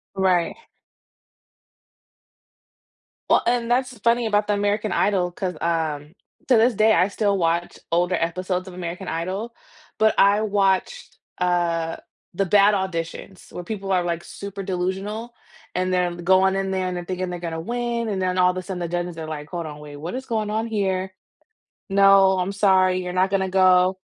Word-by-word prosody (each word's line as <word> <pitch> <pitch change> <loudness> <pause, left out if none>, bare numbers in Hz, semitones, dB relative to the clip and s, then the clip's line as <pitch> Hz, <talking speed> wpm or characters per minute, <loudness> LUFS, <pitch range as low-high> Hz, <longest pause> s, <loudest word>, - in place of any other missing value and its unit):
Right. 185 -3 +1 2.7
Well, - - +5
and 240 -1 +1
that's 255 0 0
funny 235 +2 +2
about 210 -1 +2
the 210 - +2
American 205 +1 0
Idol 185 -3 +1
'cause, 180 -3 -4
um, 160 -2 -2 0.3
to 250 -4 +5
this 230 +1 +3
day 215 +2 +4
I 185 - +4
still 200 -1 0
watch 170 0 -1
older 175 +2 +2
episodes 185 +2 -2
of 180 - -9
American 180 +1 -6
Idol, 190 +8 -4 0.4
but 220 0 +4
I 200 +2 +5
watched, 200 - 0 0.2
uh, 170 -2 0 0.4
the 195 +2 +1
bad 205 +2 +5
auditions 185 0 -5
where 175 - -7
people 195 0 -5
are 180 -2 +2
like 170 -1 -3
super 200 0 -8
delusional 195 +5 -3 0.4
and 185 0 -1
then 180 -1 0
going 190 +2 +3
in 195 0 -1
there 190 -1 -1
and 180 - -3
they're 175 - -5
thinking 185 0 -3
they're 175 - -5
gonna 165 -2 -4
win, 235 +3 -2
and 195 -2 -2
then 185 0 0
all 180 0 +4
of 185 - -8
a - - -2
sudden 185 0 -6
the 175 - -2
judges 175 0 -3
are 160 -1 -6
like, 150 -1 -6
"Hold 170 -2 -4
on, 150 -1 -8
wait, 145 -1 -10
what 165 +7 -6
is 260 0 -5
going 220 -3 -1
on 220 +1 -1
here? 190 -3 -1 0.8
No, 195 -1 +5
I'm 185 +2 -1
sorry 185 -2 +3
you're 180 0 -5
not 185 +1 +2
gonna 190 -1 0
go." 185 0 +4
185 Hz, 175 wpm, -23 LUFS, 175-205 Hz, 2.7 s, Well